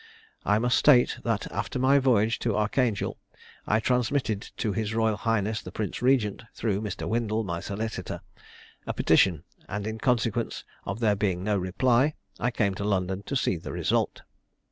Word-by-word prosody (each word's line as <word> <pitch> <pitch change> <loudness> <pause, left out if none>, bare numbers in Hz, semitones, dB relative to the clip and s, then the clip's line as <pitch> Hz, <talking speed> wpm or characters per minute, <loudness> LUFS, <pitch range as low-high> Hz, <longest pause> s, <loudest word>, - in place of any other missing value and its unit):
I 105 - +3
must 120 +3 +2
state 125 -5 +5
that 115 -3 0
after - - -3
my 135 +2 +4
voyage 115 -4 +2
to 115 -4 0
Archangel, 110 0 0 0.5
I 110 - +3
transmitted 125 -2 0 0.2
to 105 - -1
his 110 +2 -2
royal 110 -1 +2
highness 110 0 0
the - - -9
Prince 110 +1 -4
Regent, 125 -5 +2
through 105 -3 -1
Mr. 105 -3 -4
Windle, 110 0 0
my 85 -4 -3
solicitor, 110 +4 -4 0.7
a - - -2
petition, 85 -6 +3 0.3
and 105 0 -3
in 110 +1 -4
consequence 115 -2 0 0.2
of 100 +4 -4
there 105 -3 +3
being 95 -3 -1
no 105 +1 +1
reply 120 - +2 0.2
I 120 - +1
came 105 -5 0
to - - -1
London 95 -2 0
to 140 - -2
see 105 -8 +1
the 80 - -7
result. - - 0
110 Hz, 165 wpm, -27 LUFS, 100-120 Hz, 0.7 s, state